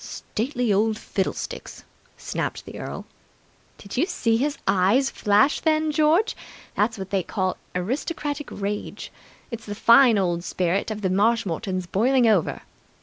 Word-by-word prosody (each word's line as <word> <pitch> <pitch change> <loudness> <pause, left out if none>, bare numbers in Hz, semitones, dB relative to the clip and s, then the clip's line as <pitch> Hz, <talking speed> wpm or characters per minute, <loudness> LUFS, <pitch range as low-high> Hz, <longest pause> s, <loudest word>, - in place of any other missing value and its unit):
"Stately 245 -1 -2
old 215 +2 +2
fiddlesticks!" 195 -3 -4 0.3
snapped - - -4
the - - -9
earl. - - -6 0.7
"Did 200 - -9
you 320 +8 +2
see 230 - +1
his 285 +5 0
eyes 205 +9 +3
flash 210 +7 +3
then, 310 -1 +1
George? 315 +8 +3 0.4
That's 220 +2 0
what 190 -1 -7
they 195 -1 +2
call 185 +1 -2 0.2
aristocratic 290 - -3
rage. 205 +1 -5 0.4
It's 230 -1 -7
the 205 - -4
fine 235 +1 +6
old 175 -3 0
spirit 185 +3 -1
of 215 -1 -4
the 185 - +1
Marshmoretons 190 -3 0
boiling 240 +8 +2
over." 205 -7 +2
220 Hz, 140 wpm, -24 LUFS, 195-270 Hz, 0.7 s, fine